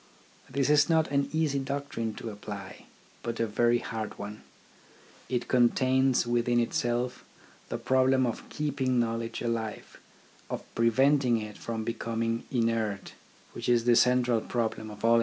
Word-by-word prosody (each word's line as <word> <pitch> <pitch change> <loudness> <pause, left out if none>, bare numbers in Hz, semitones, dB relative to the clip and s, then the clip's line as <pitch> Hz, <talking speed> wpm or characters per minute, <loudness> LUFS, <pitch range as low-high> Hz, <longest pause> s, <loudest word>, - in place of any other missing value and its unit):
This 140 +1 +1
is 150 +1 +5
not 160 -1 +3
an 140 0 +1
easy 155 -3 +1
doctrine 135 -5 -3
to 115 - -6
apply, 100 -1 -8 0.3
but 115 -1 -4
a 115 - +2
very 120 +2 +2
hard 110 -2 -5
one. 105 +1 -7 0.9
It 125 -1 -1
contains 130 +1 +3
within 120 0 +2
itself 120 +1 -1 0.5
the - - -2
problem 130 0 +3
of 120 - -4
keeping 135 -4 0
knowledge 115 0 -2
alive, 115 -2 -4 0.5
of - - -4
preventing 125 +2 +3
it 105 -1 -7
from 115 -1 -4
becoming 115 0 -2
inert, 115 -5 -1 0.4
which - - -4
is 120 -1 +4
the 120 0 +4
central 125 -2 +3
problem 110 -2 -2
of 105 +1 -6
all 115 0 +6
education. - - +5
120 Hz, 145 wpm, -29 LUFS, 115-130 Hz, 0.9 s, all